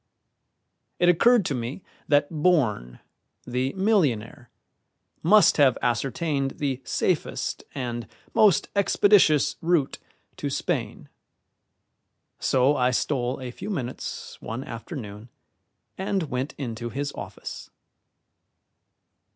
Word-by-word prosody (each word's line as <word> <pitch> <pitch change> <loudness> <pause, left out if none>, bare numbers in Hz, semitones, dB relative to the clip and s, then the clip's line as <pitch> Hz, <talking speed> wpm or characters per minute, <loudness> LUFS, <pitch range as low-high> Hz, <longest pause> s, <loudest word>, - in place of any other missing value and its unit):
It 175 - +4
occurred 225 +4 +5
to 145 - -1
me 125 +7 -5 0.2
that 145 +1 +3
Bourne, 135 - +1 0.5
the 125 +2 -1
millionaire, 145 - 0 0.7
must 200 +3 +5
have 140 -4 +5
ascertained 135 +3 -1
the 135 -3 -2
safest - - -1
and 120 -3 -4 0.3
most 205 -6 +4
expeditious 200 -6 +4
route 165 -5 +1 0.4
to - - -3
Spain; - - -3 1.3
so 135 +2 +3
I 125 -2 +2
stole 125 0 -1
a 130 -2 -6
few 195 +11 -7
minutes 130 - -5
one 115 +4 -5
afternoon 115 - -8 0.7
and 190 -5 -1
went 130 +3 -3
into 120 -3 -4
his 140 +3 -4
office. - - -8
135 Hz, 100 wpm, -25 LUFS, 120-170 Hz, 1.3 s, occurred